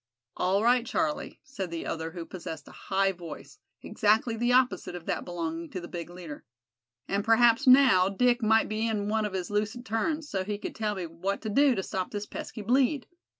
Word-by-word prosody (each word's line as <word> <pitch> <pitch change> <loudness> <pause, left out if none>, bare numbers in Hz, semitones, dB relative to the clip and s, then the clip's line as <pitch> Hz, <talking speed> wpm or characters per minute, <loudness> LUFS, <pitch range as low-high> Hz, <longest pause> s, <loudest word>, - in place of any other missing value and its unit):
"All 190 +3 +1
right, 245 +1 +4
Charlie," 305 +5 -2
said 195 -9 -5
the 165 0 -5
other, 160 0 -3
who 170 0 -7
possessed 165 -4 -8
a - - -12
high 195 0 0
voice, 170 -4 -10 0.2
exactly 220 +2 +2
the 240 +2 +1
opposite 245 -8 +2
of 175 -2 -8
that - - -2
belonging 165 -1 -4
to 185 - -5
the 175 - -8
big 170 -1 -6
leader. 175 -4 -9 0.6
"And 200 +1 0
p'raps, 230 +4 +4
now, 255 -8 +7
Dick 245 +5 +2
might 220 0 +4
be 215 +1 -1
in 210 -2 -1
one 220 0 +1
of 205 - -4
his 185 0 -3
lucid 215 +4 -2
turns, 295 +8 -1
so 190 -8 -2
he 205 +1 -3
could - - -6
tell 215 -1 -2
me 185 -2 -4
what 170 +5 -3
to 220 - -2
do 275 +4 +4
to 190 - -2
stop 185 -1 -3
this 205 0 -4
pesky 215 +1 -7
bleed. 260 +4 +2
210 Hz, 205 wpm, -28 LUFS, 180-240 Hz, 0.6 s, now